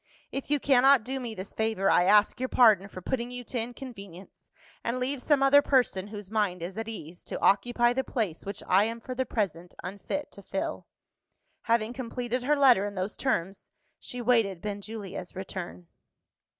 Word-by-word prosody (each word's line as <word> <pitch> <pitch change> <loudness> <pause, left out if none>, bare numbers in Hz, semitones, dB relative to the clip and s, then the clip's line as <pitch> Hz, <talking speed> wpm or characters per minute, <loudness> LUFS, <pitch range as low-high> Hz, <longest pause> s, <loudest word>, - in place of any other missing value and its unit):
If 275 - -5
you 295 0 +2
cannot 270 -2 +5
do 265 +3 -3
me 235 -3 -5
this 190 0 -7
favour, 220 -3 0
I 175 - +4
ask 210 +4 +4
your 255 0 -2
pardon 215 -6 +5
for 185 -2 -10
putting 240 +1 -2
you 250 0 -7
to 245 +1 -4
inconvenience, 225 -6 -9 0.3
and 235 +2 -1
leave 260 +1 -1
some 285 -1 +3
other 280 +1 +7
person, 245 -9 +1
whose 205 -2 -9
mind 200 -6 0
is 180 +2 -5
at 225 0 -4
ease, 175 -6 -8
to - - -5
occupy 240 +3 +3
the 265 +1 0
place 210 -12 -3
which 200 0 -6
I 195 +3 +5
am 230 +1 -4
for 255 +2 -6
the 260 0 -2
present 180 -6 -3
unfit 200 +10 -5
to 200 - -12
fill." 195 - -4 0.8
Having 230 0 +1
completed 250 0 -3
her 290 +4 +2
letter 250 -8 +5
in 200 - -7
those 185 +3 -3
terms, 195 -7 -2 0.3
she 245 - -5
waited 225 -6 +2
Benjulia's 205 -2 -6
return. 185 -2 -7
225 Hz, 180 wpm, -28 LUFS, 195-250 Hz, 0.8 s, other